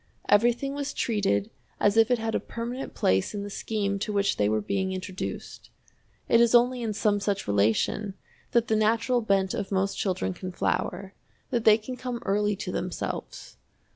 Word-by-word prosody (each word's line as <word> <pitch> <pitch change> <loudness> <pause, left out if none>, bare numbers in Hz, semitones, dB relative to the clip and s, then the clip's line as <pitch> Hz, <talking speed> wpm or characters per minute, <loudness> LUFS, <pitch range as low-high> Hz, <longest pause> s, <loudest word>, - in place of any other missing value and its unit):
Everything 240 +6 +3
was 285 0 -4
treated 150 - 0 0.3
as 205 0 +3
if 225 +1 +5
it 245 - +3
had 225 0 -3
a - - +1
permanent 240 +3 -6
place 95 - +1
in 200 - -3
the 205 - -7
scheme 200 -2 -2
to 210 - -2
which 200 -1 +1
they 105 0 +2
were 110 0 +1
being 190 - -1
introduced. 185 0 -6 0.6
It 230 - +5
is 235 0 +5
only 245 +1 +4
in 225 -2 -1
some 205 -1 +1
such 200 -1 -2
relation 110 - +1 0.4
that 235 -1 +2
the 220 - +2
natural 230 +3 +2
bent 195 -3 +1
of 195 - -4
most 195 0 0
children 175 - -1
can 185 - -6
flower, 190 +2 -2 0.4
that 235 -3 0
they 215 -1 +7
can 250 +3 -7
come 250 -1 -4
early 205 +1 +1
to 185 -1 -5
themselves. 180 0 -5
205 Hz, 180 wpm, -27 LUFS, 190-230 Hz, 0.6 s, they